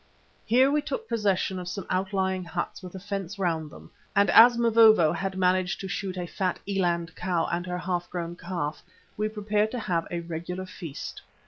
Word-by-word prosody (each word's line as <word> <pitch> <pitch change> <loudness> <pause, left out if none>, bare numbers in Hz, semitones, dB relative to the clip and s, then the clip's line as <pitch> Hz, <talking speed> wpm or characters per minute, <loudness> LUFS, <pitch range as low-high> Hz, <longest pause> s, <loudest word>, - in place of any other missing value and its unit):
Here 255 +5 +5
we 300 +1 +2
took 455 +8 -4
possession 195 -4 0
of 180 - -7
some 180 0 -5
outlying 190 0 0
huts 175 +2 -4
with 185 0 -9
a - - -5
fence 200 0 -5
round 165 -5 -1
them, - - -14 0.2
and 200 0 +4
as 235 +1 +8
Mavovo 225 -8 +6
had 190 +2 -3
managed 185 0 +1
to 195 - -4
shoot 190 -1 -4
a 180 - -2
fat 185 +1 -2
eland 175 -4 0
cow 175 -2 0
and 175 +2 -2
her 180 0 -2
half 180 -1 -2
grown 170 -1 -4
calf, 170 -4 -4 0.3
we 215 +1 -1
prepared 210 0 0
to 245 - -4
have 175 -6 -1
a 170 -1 -3
regular 170 +2 -5
feast. 165 -5 -8
185 Hz, 190 wpm, -27 LUFS, 175-205 Hz, 0.3 s, as